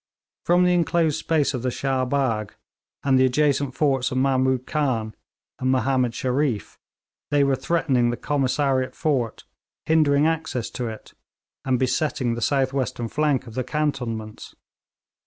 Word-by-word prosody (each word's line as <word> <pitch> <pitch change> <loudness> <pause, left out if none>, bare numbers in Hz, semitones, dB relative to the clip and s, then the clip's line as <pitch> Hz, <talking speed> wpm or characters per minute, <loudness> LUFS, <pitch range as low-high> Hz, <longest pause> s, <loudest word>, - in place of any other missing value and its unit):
From 175 +1 +4
the 180 0 +3
enclosed 170 -3 +1
space 155 -3 +1
of 125 - -3
the 130 - 0
Shah 130 0 -1
Bagh, 125 -6 -1 0.5
and 135 -2 +3
the 130 - +5
adjacent 140 0 +1
forts 135 -3 +1
of 130 - -3
Mahmood 130 -1 +1
Khan 125 -8 -1 0.5
and 130 0 +1
Mahomed 130 -2 +1
Shereef, 130 -3 -1 0.5
they 145 -1 +3
were 140 -1 +2
threatening 135 -6 +1
the 120 - -2
Commissariat 135 -1 0
fort, 130 -7 -1 0.4
hindering 150 -2 +3
access 160 -7 -1
to 125 - -4
it, 110 -1 -9 0.5
and 130 -1 +2
besetting 130 -1 0
the 120 - -4
south 135 +1 +1
western 125 -3 -2
flank 145 -2 0
of 115 - -11
the 130 +2 -2
cantonments. 125 -7 -3
130 Hz, 145 wpm, -23 LUFS, 125-145 Hz, 0.5 s, the